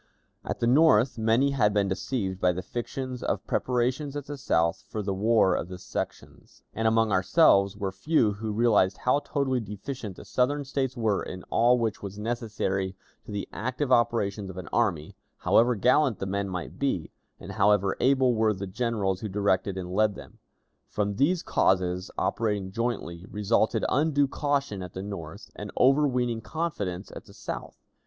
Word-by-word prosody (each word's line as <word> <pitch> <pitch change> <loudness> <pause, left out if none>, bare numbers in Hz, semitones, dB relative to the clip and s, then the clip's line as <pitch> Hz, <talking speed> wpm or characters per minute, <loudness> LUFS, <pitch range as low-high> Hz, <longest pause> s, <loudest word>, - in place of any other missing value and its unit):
At - - -4
the - - +1
North 125 -3 +4
many 115 +5 +3
had 105 -6 +2
been 100 -1 +2
deceived 95 -1 -3
by 90 0 +3
the 90 +1 -5
fictions 125 +1 -5
of - - -2
preparations 130 +3 -1
at 145 -2 -4
the 145 - -6
South 85 -12 0
for 110 - -3
the 100 0 -1
war 105 0 +3
of - - -2
the 90 0 -8
sections, - - -7
and 110 0 0
among 110 -1 +3
ourselves 100 - +4
were 100 -2 -2
few 110 +3 +2
who 110 +2 -4
realized 105 -4 +3
how 125 +3 +2
totally 135 -3 -1
deficient 105 0 -6
the - - -12
Southern 140 +3 0
States 130 -2 -2
were 110 -4 +1
in 90 0 -7
all 120 +2 +4
which 115 -3 -2
was 100 0 -7
necessary 105 -4 -2 0.3
to - - -7
the 100 -1 -4
active 130 +4 -2
operations 105 -5 +1
of 95 - -9
an 90 - -6
army, 90 -10 0 0.2
however 120 +1 +3
gallant 125 +3 +3
the - - -4
men 100 +1 -2
might 90 -2 -6
be, 135 - -1 0.3
and - - -8
however 100 -1 +3
able 130 -1 +3
were 110 -1 +2
the 95 +1 -5
generals 100 -2 -1
who 110 - -4
directed 100 -1 0
and 90 -1 -5
led 105 0 +2
them. - - -13 0.5
From 100 -1 -2
these 165 +7 +2
causes, 90 -1 +1
operating 105 -4 -1
jointly, 95 -6 -3
resulted 110 +2 +1
undue 145 0 +2
caution 140 -7 -1
at 90 -1 -8
the 95 - -5
North 100 -1 -8
and 105 -1 -7
overweening 125 -4 +3
confidence 105 - -4
at - - -9
the - - -16
South. - - -6
110 Hz, 175 wpm, -27 LUFS, 95-125 Hz, 0.5 s, North